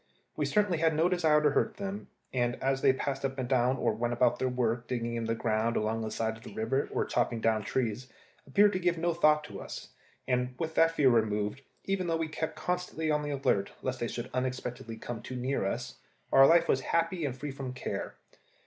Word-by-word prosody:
We - - 0
certainly 205 -6 +1
had 160 -1 +2
no 160 +3 +3
desire 160 -4 +3
to 150 - +4
hurt - - 0
them, 200 0 -5 0.3
and 120 -1 +1
they, - - -17
as 135 0 +1
they - - +6
passed 135 +1 -3
up 135 0 -2
and 130 -2 -2
down 130 0 +2
or 115 -3 +1
went 120 +2 -1
about 120 0 +2
their 130 - +1
work 120 -1 -1
digging 120 -2 -2
in 115 -1 -2
the 115 0 0
ground 115 0 0
along 110 +1 0
the 110 - -3
side 110 +1 -2
of - - -17
the - - -10
river 120 +5 0
or - - 0
chopping 120 -1 0
down 110 -1 +2
trees, 120 +2 -2 0.4
appeared 205 +9 +4
to 185 - 0
give 175 -1 +1
no 170 +1 +1
thought 155 -2 +4
to 100 -8 -8
us; - - -8 0.4
and 125 0 0
with 160 +1 -3
that 165 0 +5
fear 140 -5 +4
removed, 105 +1 +1 0.2
even 195 -2 -1
though 165 -1 +1
we 165 -1 -1
kept 160 0 -3
constantly 160 -1 -2
on 150 0 +2
the 145 - -4
alert, 130 -8 0
lest 130 -1 -2
they 120 - -1
should 120 +2 -5
unexpectedly 125 -3 -3
come 115 0 -6
too 130 - -7
near 125 -4 -1
us, 125 +4 -4 0.3
our 135 0 +8
life 170 0 +5
was 130 - +2
happy 165 +3 0
and 130 -3 -2
free 145 +2 -5
from 135 -1 -5
care. 130 -1 -5
130 Hz, 230 wpm, -30 LUFS, 120-155 Hz, 0.4 s, our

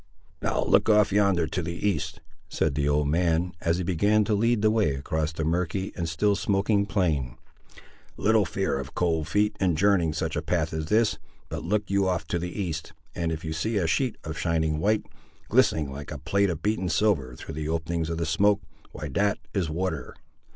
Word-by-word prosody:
"Now - - 0
look - - +3
off 105 -2 +5
yonder 100 -5 +3
to 90 - -3
the 85 0 -4
East," 85 -3 -2 0.3
said 75 - 0
the 70 +1 0
old 75 0 +2
man, 85 +2 +1
as 85 +1 +1
he 90 - -2
began 100 +5 +2
to 105 - 0
lead 115 +1 +2
the 110 - +5
way 95 -11 +2
across 75 +3 -2
the 80 0 -4
murky 90 +4 -1
and 85 -2 -2
still 100 +6 +2
smoking 100 +1 +1
plain; 75 - 0 0.8
"little 110 0 +3
fear 95 -4 -1
of 70 +2 -8
cold 80 -3 0
feet 105 +5 +1
in 90 -4 +2
journeying 90 -3 +3
such 80 - -2
a - - 0
path - - -1
as 80 -1 -3
this: 110 +2 +2 0.3
but - - -5
look 105 +3 0
you 100 -1 +2
off 90 -2 -1
to 85 - 0
the 90 +1 -3
East, 85 -5 -4 0.2
and 85 -1 -2
if 80 0 -4
you 80 - -3
see 110 +8 -1
a 95 - +1
sheet 120 +8 +1
of 80 -1 -5
shining 80 0 0
white, 105 +5 +1 0.4
glistening 75 -4 +3
like 70 +1 -7
a 75 - -5
plate 95 +8 +1
of 80 -2 -4
beaten 105 -4 0
silver 80 - +1
through - - -8
the 75 0 -4
openings 80 0 -1
of 85 - -2
the 85 - -1
smoke, 100 +6 +3 0.3
why 75 +1 -5
that 100 +8 +1 0.2
is 95 -6 0
water. 80 -4 -3
85 Hz, 205 wpm, -26 LUFS, 80-100 Hz, 0.8 s, off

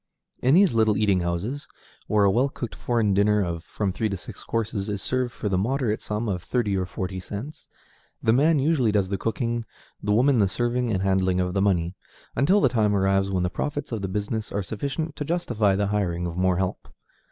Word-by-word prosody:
In 130 +4 +4
these 190 -4 +5
little 110 -2 +3
eating 100 -3 +3
houses, 90 - -3 0.4
where 105 -1 +3
a 100 - +5
well 125 +7 +2
cooked 120 -4 -6
foreign 115 -4 0
dinner 105 +1 +3
of 85 -1 -4
from 100 0 -2
three 110 +2 -1
to 100 - -3
six - - -10
courses 110 -3 -2
is 100 -1 -2
served 125 +4 -1
for 110 - -5
the 95 -2 +1
moderate 120 0 0
sum 105 +2 -3
of 90 -4 -2
thirty 105 -1 0
or 95 -1 -1
forty 95 0 -4
cents, 110 - -7 0.5
the 110 - +2
man 150 +5 +4
usually 135 -5 +2
does 100 -3 +1
the 100 - -1
cooking, 115 +1 -1 0.4
the 105 - -1
woman 125 +4 +4
the 100 - +4
serving 120 +5 -1
and 95 -2 0
handling 95 -1 +2
of 90 0 0
the 95 - +1
money, 90 -3 +1 0.4
until 170 +11 +4
the - - +5
time 105 -4 +2
arrives 95 0 +2
when 95 -2 0
the 90 - +1
profits 145 +9 -3
of 110 -3 -3
the 95 - -2
business 105 +3 -3
are 100 - -1
sufficient 140 - -4
to - - -2
justify 120 - +1
the 100 +1 +1
hiring 90 -4 0
of 85 -1 -4
more 90 0 +2
help. 95 0 -2
105 Hz, 215 wpm, -25 LUFS, 95-120 Hz, 0.5 s, these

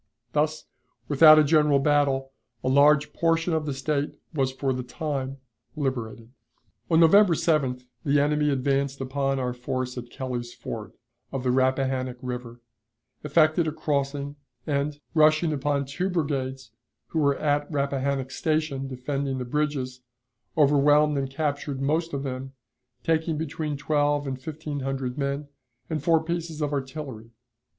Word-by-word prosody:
Thus, 155 +1 0 0.4
without 155 +2 +8
a 155 - +7
general 150 -1 +4
battle, 135 -2 +2 0.3
a - - -1
large 140 +2 +4
portion 165 +1 +1
of 155 -1 -1
the 145 - -1
State 145 +1 -1 0.2
was 135 -4 +1
for 130 0 -1
the 130 - -3
time 135 0 -4 0.4
liberated. 125 -5 -3 0.6
On 165 -1 +4
November 175 +2 +6
7th 135 -6 0 0.2
the 145 0 +3
enemy 150 +1 +2
advanced 140 0 0
upon 135 +1 -1
our 125 -1 -1
force 125 0 -3
at 120 0 -10
Kelly's 120 -2 -5
Ford, 110 -2 -7 0.4
of 135 -2 -3
the 125 - +2
Rappahannock 130 -1 +1
River, 125 -1 -6 0.6
effected 155 +2 +3
a - - 0
crossing, 145 -1 -2 0.3
and, 145 0 -1
rushing 155 0 +4
upon 140 0 0
two 180 +8 -2
brigades 135 - -2 0.4
who 160 - -1
were 140 -2 +2
at 145 0 0
Rappahannock 140 -2 -1
Station 155 -4 -1
defending 135 +1 -3
the 125 - -3
bridges, 130 -2 -2 0.6
overwhelmed 150 0 +4
and 135 -1 -1
captured 145 -1 -2
most 160 +5 0
of 140 -1 -3
them, 135 0 -5 0.5
taking 160 -1 +1
between 150 -1 -3
twelve 145 0 +1
and 130 -1 -4
fifteen 155 0 -5
hundred 135 -1 -3
men, 140 +1 -2 0.4
and 155 -2 -1
four 160 0 +3
pieces 165 -1 -3
of 150 -1 -1
artillery. 135 -5 -5
140 Hz, 145 wpm, -26 LUFS, 130-150 Hz, 0.6 s, without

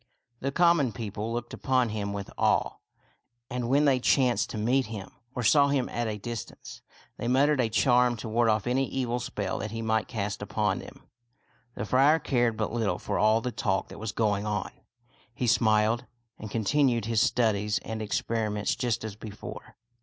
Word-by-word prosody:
The 135 - -2
common 170 -6 +3
people 105 +1 -4
looked 120 0 -4
upon 130 -2 +1
him 105 -2 -3
with 100 -1 -6
awe; - - +1 0.7
and 125 -1 -2
when 140 +3 +4
they 135 -3 +4
chanced 125 -1 +2
to - - -5
meet 125 +4 +1
him, 105 -3 -7 0.2
or 125 - -2
saw 140 +5 +5
him 140 -3 +1
at 120 0 -2
a 105 -1 -3
distance, 115 +2 -7 0.4
they 120 - -4
muttered 140 +3 +3
a 120 -3 +2
charm 125 +1 +3
to 110 - -6
ward 115 +1 +2
off 110 -1 +1
any 130 +2 +1
evil 125 -2 -1
spell 100 -4 -3
that 110 - -4
he 115 +1 -5
might 110 -1 0
cast 105 -3 -3
upon 105 -1 -1
them. - - -12 0.7
The - - -4
friar 135 +7 +4
cared 120 -7 0
but 110 0 -2
little 105 -7 0
for 100 - -3
all 110 +1 +4
the 125 - -3
talk 95 -5 -1
that - - -10
was 110 -1 -3
going 105 -3 0
on. 105 -3 -2 0.6
He 125 - -2
smiled, 110 +1 +2 0.3
and 110 - -7
continued 120 +1 +1
his 115 -1 +1
studies 105 -3 +1
and 110 -1 -4
experiments 105 +1 -1
just 120 -4 -1
as 110 -2 -5
before. 105 -1 -9
115 Hz, 185 wpm, -28 LUFS, 105-125 Hz, 0.7 s, saw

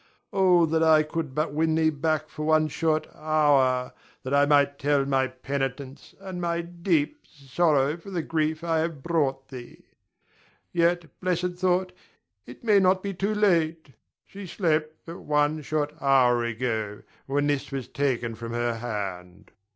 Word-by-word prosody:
Oh, 180 -3 +4
that 160 0 0
I 160 -1 +5
could 155 -3 -5
but 155 -1 -1
win 160 +1 +1
thee 160 0 +3
back 155 +1 -1
for 155 - -7
one 155 0 +3
short 155 0 0
hour, 145 -5 +2 0.3
that 130 - -4
I 140 0 +4
might 140 -1 +3
tell 140 -1 +2
my 135 -1 +1
penitence 135 +1 -5
and 190 -2 -7
my 170 0 -1
deep 170 - -2
sorrow 145 0 +1
for 175 +3 -12
the 175 -4 -3
grief 155 0 -1
I 165 -1 +1
have 160 -4 -3
brought 135 -6 -1
thee. 125 -3 -11 0.9
Yet, 170 0 +1
blessed 180 -1 -1
thought, 185 0 +1 0.6
it 125 - -12
may 210 -3 +5
not 185 0 +2
be 200 -1 -3
too 200 +4 -1
late. 165 -7 +1 0.3
She 195 -1 -10
slept 155 -3 0
but 165 +1 -8
one 150 +1 0
short 150 0 -2
hour 125 -3 +4
ago, 110 -3 -3 0.2
when 145 +1 0
this 145 -1 -1
was 135 -3 -4
taken 125 -5 -1
from 115 +1 -7
her 120 -1 -1
hand. 95 -6 -6
155 Hz, 160 wpm, -26 LUFS, 135-170 Hz, 0.9 s, I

